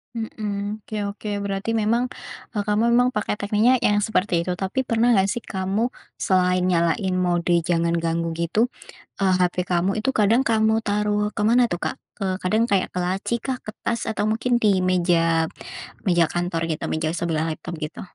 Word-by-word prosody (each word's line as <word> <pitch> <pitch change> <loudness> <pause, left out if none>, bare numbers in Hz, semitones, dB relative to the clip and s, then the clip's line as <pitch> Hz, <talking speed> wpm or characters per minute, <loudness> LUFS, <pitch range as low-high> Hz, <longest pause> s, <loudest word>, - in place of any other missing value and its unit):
Mhm, 210 -2 -4
oke 215 - -6 0.2
oke 210 +1 -7
berarti 200 +3 -2
memang, 230 +3 +1 0.5
eee, 205 - 0
kamu 210 +1 +2
memang 245 +1 +4
pakai 210 -3 -1
tekniknya 210 +5 +3
yang 205 0 +3
seperti 205 -2 0
itu 180 - 0
tapi 190 +7 -2
pernah 235 +1 +3
nggak 195 -4 +4
sih 240 +3 -3
kamu 195 +5 -1 0.2
selain 180 -1 +2
nyalain 175 +2 +1
mode 175 -1 +1 0.2
jangan 170 -1 +1
ganggu 165 0 -1
gitu, 170 +9 0 0.5
eee, 190 -1 +4
HP 180 0 +1
kamu 180 +2 +2
itu 270 - +1
kadang 225 +1 +3
kamu 220 -2 +2
taruh 210 0 0
ke 210 - -3
mana 240 +3 +5
tuh 175 - -2
Kak? - - -2 0.2
Ke 200 - -3 0.2
kadang 215 +5 +2
kayak 200 -5 +1
ke - - -4
laci 185 +5 -1
kah, 255 +2 -3
ke - - -6 0.2
tas, 235 -1 0
atau 215 - -1
mungkin 235 +3 +1
di 200 -4 +3
meja 165 -2 +2 0.6
meja 175 -2 +4
kantor 175 0 -2
gitu - - -7
meja 155 0 -1
sebelah 165 -2 -1
laptop 170 - -8
gitu? 155 -1 -6
200 Hz, 180 wpm, -23 LUFS, 175-220 Hz, 0.6 s, mana